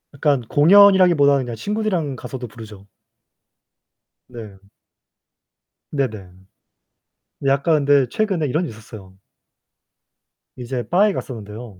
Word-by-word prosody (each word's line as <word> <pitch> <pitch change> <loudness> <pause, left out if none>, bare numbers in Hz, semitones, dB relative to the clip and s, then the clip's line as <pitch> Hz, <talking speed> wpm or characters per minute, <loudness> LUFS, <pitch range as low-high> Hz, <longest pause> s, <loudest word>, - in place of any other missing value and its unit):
약간 140 -2 0
공연이라기보다는 165 - +4
그냥 120 -1 -6
친구들이랑 185 - -3
가서도 125 0 -8
부르죠. 105 -3 -13 1.4
네. 110 -5 -11 1.3
네네. 110 -10 -4 1.2
약간 140 +2 +1
근데 140 -2 +3
최근에 190 - -1
이런 155 +6 -1
일이 165 - -6
있었어요. 110 -4 -14 1.4
이제 125 0 -5
바에 200 +3 +2
갔었는데요. 110 - -9
135 Hz, 255 characters per minute, -20 LUFS, 115-165 Hz, 1.4 s, 공연이라기보다는